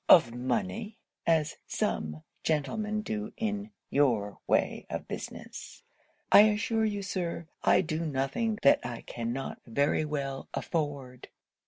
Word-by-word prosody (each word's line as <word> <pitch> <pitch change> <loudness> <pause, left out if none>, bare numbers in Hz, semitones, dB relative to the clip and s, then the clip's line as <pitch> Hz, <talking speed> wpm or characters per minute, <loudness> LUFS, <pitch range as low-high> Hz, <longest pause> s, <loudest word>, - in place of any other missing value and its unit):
of 115 - +8
money, 205 - -2 0.3
as 160 -3 +2
some 75 0 -2 0.2
gentlemen 210 +8 0
do 105 - -3
in 210 -2 -2 0.2
your 115 -8 +2
way - - +2
of - - -4
business, - - -7 0.5
I - - +11
assure 220 +1 +1
you, 205 -2 -1
Sir, 175 -3 -3 0.2
I - - +5
do 165 -2 -2
nothing 155 - 0
that 140 - +6
I 120 -1 -5
cannot 120 +3 -4
very 140 +6 +2
well 140 -3 -3
afford.' 140 -6 -3
150 Hz, 125 wpm, -30 LUFS, 130-210 Hz, 0.5 s, I